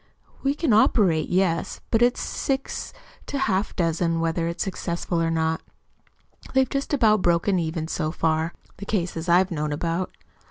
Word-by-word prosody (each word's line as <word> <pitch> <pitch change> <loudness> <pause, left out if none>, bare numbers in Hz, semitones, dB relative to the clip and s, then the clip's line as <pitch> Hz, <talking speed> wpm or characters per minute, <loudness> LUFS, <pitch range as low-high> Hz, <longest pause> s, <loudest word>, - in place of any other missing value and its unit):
"We 275 +1 +1
can 300 -6 +1
operate 185 -7 +3
yes; 180 -2 0
but 225 - +3
it's 245 +1 +3
six 270 0 -3 0.4
to 285 - -3
half 200 -6 +1
a - - -16
dozen 165 -1 +1
whether 165 0 0
it's 170 - -2
successful 170 -2 -2
or 165 - +1
not. 160 0 0 0.9
They've 265 0 +4
just 275 +2 -3
about 220 -8 +4
broken 175 +2 +2
even 160 -1 -2
so 155 -2 -2
far 160 0 0 0.2
the 200 - -7
cases 175 -4 -2
I've 180 +2 +4
known 150 -2 -2
about. 165 +4 -1
175 Hz, 160 wpm, -24 LUFS, 165-210 Hz, 0.9 s, They've